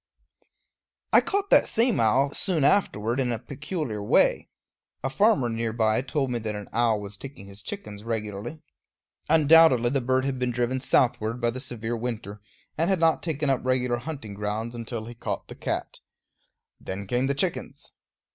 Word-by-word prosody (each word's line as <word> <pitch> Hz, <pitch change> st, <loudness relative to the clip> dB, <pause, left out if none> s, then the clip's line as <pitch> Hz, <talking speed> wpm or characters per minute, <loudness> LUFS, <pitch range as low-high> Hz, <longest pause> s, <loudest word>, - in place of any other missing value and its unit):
I -, -, +8 dB
caught 400 Hz, 0 st, 0 dB
that -, -, +6 dB
same 230 Hz, +1 st, +2 dB
owl 130 Hz, +6 st, +3 dB
soon 175 Hz, -7 st, 0 dB
after 120 Hz, -, +2 dB
in 125 Hz, -1 st, 0 dB
a 115 Hz, -, -1 dB
peculiar 140 Hz, -, -5 dB
way. 100 Hz, -, +2 dB, 0.5 s
A 135 Hz, -, -1 dB
farmer 145 Hz, -, +3 dB
near 115 Hz, -1 st, -2 dB
by 110 Hz, 0 st, +2 dB
told 135 Hz, 0 st, -2 dB
me 120 Hz, -, -1 dB
that 110 Hz, -1 st, -4 dB
an 105 Hz, -1 st, -7 dB
owl 115 Hz, -2 st, +2 dB
was 100 Hz, 0 st, -7 dB
taking 135 Hz, -4 st, -10 dB
his 100 Hz, +1 st, -10 dB
chickens 105 Hz, -, -7 dB
regularly. 110 Hz, +5 st, -5 dB, 0.7 s
Undoubtedly 155 Hz, -6 st, +6 dB
the 135 Hz, -1 st, +1 dB
bird 130 Hz, +1 st, +1 dB
had 135 Hz, -2 st, -2 dB
been 125 Hz, 0 st, 0 dB
driven 125 Hz, +2 st, -1 dB
southward 120 Hz, -2 st, +1 dB
by 120 Hz, -1 st, +1 dB
the 130 Hz, -, -6 dB
severe 120 Hz, -3 st, -4 dB
winter, 110 Hz, -4 st, -5 dB, 0.4 s
and 165 Hz, +3 st, +2 dB
had 190 Hz, -2 st, +2 dB
not 165 Hz, -1 st, +3 dB
taken 150 Hz, -4 st, -1 dB
up 130 Hz, -, -1 dB
regular 125 Hz, -1 st, +1 dB
hunting 135 Hz, -5 st, -7 dB
grounds 105 Hz, +3 st, -3 dB
until 115 Hz, -1 st, -5 dB
he 120 Hz, -, -8 dB
caught 115 Hz, -, -5 dB
the -, -, -7 dB
cat. -, -, -4 dB, 0.8 s
Then 100 Hz, +2 st, -6 dB
came 125 Hz, +6 st, 0 dB
the 140 Hz, -, +1 dB
chickens. -, -, -3 dB
120 Hz, 175 wpm, -26 LUFS, 110-140 Hz, 0.8 s, I